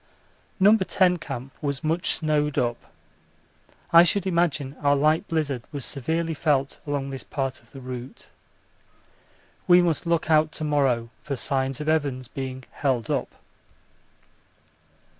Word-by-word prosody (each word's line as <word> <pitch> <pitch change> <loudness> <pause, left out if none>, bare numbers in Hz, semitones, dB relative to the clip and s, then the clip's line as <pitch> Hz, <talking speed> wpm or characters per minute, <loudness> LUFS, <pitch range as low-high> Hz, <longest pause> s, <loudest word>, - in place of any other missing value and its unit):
No. 205 +3 +7
10 185 -3 +2
Camp 135 -5 -7
was 140 -2 -2
much 165 +3 0
snowed 150 -2 0
up: 120 -1 -2 1.0
I 170 - +10
should 185 +2 +2
imagine 170 -6 0
our 145 -1 +4
light 155 +3 +2
blizzard 145 -6 -1
was 140 -4 -4
severely 160 +4 -2
felt 140 -3 0
along 140 -1 -2
this 135 - -6
part 135 -2 -3
of 115 - -26
the 135 - -11
route. 125 0 -8 1.4
We 175 0 +7
must 170 -1 +1
look 170 -2 +1
out 155 0 +4
to - - -5
morrow 135 -6 +1
for 140 - -4
signs 135 +1 -1
of 150 - -5
Evans 140 -5 0
being 130 0 -6
'held 130 -6 -1
up.' - - -2
145 Hz, 140 wpm, -25 LUFS, 135-160 Hz, 1.4 s, I